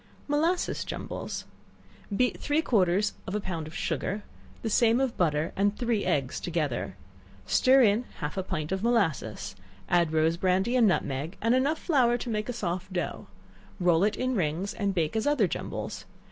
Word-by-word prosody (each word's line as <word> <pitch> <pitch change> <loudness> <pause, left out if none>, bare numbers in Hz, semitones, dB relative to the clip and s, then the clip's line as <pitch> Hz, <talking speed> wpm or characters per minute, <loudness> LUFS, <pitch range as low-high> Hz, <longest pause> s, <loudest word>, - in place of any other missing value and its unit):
Molasses 320 +5 +1
Jumbles. - - -5 0.7
Beat 250 -1 +1
three 295 +2 +1
quarters 200 - +2
of 190 - -3
a - - +1
pound 170 -6 -4
of 155 - -10
sugar, 205 +1 -2 0.4
the - - -1
same 230 +2 +4
of 265 -3 0
butter, 155 -2 +1
and 205 +1 +1
three 235 -4 0
eggs 135 -3 0
together; 155 -7 -2 0.5
stir 265 0 +5
in 220 +3 +3
half 150 -2 -4
a 190 - 0
pint 155 -3 -4
of 190 0 -1
molasses; 200 - 0 0.3
add 170 -3 +3
rose 160 +1 +2
brandy 190 +6 +1
and 240 -3 +5
nutmeg, 150 -2 -1
and 230 +2 +2
enough 275 +5 +2
flour 255 -9 +2
to 240 0 -4
make 215 +1 -2
a - - -1
soft 185 -4 -3
dough; 180 -1 -3 0.5
roll 175 -1 +3
it 210 0 +2
in 255 0 0
rings, 180 -1 -1
and 200 -2 -1
bake 165 +2 0
as 220 +5 0
other 280 -9 +3
jumbles. - - -5
200 Hz, 175 wpm, -28 LUFS, 170-240 Hz, 0.7 s, stir